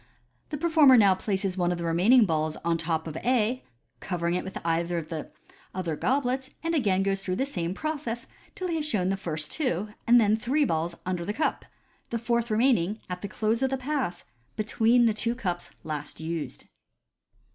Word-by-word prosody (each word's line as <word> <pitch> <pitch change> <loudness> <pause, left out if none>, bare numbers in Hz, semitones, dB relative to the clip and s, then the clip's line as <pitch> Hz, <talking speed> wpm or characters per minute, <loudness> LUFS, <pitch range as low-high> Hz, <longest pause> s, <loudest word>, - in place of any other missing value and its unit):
The 300 - -3
performer 305 -5 +6
now 200 -4 +6
places 190 0 -2
one 175 0 +2
of 175 - -1
the 170 - -4
remaining 200 +9 +5
balls 155 -3 0
on 170 0 +2
the - - -3
top 160 -1 -1
of 160 -2 -6
A, 245 +3 +1 0.4
covering 170 +1 -2
it 180 - -1
with 190 - -6
either 170 +1 0
of 160 -2 -4
the 160 -2 -5 0.5
other 175 -4 -2
goblets, 260 - 0
and 330 0 0
again 200 - +2
goes 195 0 0
through 185 -1 -1
the 265 - 0
same 180 -9 -3
process 280 -5 -3 0.3
till 370 -3 -3
he 335 -2 -1
has 305 -1 -1
shown 190 -4 +1
first 160 -5 -4
two, 215 - -1 0.2
and 240 +1 +7
then 215 -1 +4
three 270 +6 +1
balls 165 -3 -1
under 180 -1 -2
the 205 +4 -2
cup, 305 - -1 0.4
the 235 - -1
fourth 235 0 0
remaining, 220 -3 +2
at 180 0 -4
the 200 - -3
close 220 +4 0
of 265 - +2
the 270 - -1
Pass, 260 -9 -2 0.3
between 225 +3 +3
the 225 - +3
two 230 +3 -1
cups 180 -8 -3
last 150 -2 -4
used. 160 - -5
205 Hz, 195 wpm, -27 LUFS, 170-250 Hz, 0.5 s, and